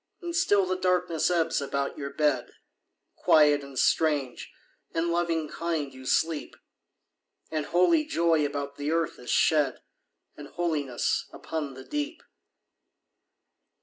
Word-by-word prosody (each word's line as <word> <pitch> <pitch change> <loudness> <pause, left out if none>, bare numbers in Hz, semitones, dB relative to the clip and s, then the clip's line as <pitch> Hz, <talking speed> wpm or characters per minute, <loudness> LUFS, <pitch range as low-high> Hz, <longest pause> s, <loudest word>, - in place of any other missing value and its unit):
And 345 -2 -5
still 205 - +3
the 185 0 -1
darkness 180 -3 +1
ebbs 165 -4 +1
about 140 0 -2
your 140 -1 -5
bed. 140 -3 0 0.6
Quiet, 150 -2 +4
and 140 -1 -10
strange, 145 -4 +1 0.4
and 165 +1 +1
loving 170 -2 0
kind, 160 -4 -3
you 130 0 -10
sleep. 160 +1 0 1.0
And 155 -2 -2
holy 240 - +3
joy 165 - +2
about 140 -1 -3
the 145 +1 -3
earth 165 -1 -1
is 125 - -10
shed; 150 -5 +2 0.5
And 145 - -10
holiness 150 -8 -1
upon 150 -4 -5
the 130 - -10
deep. 295 - -4
160 Hz, 125 wpm, -27 LUFS, 140-175 Hz, 1.0 s, Quiet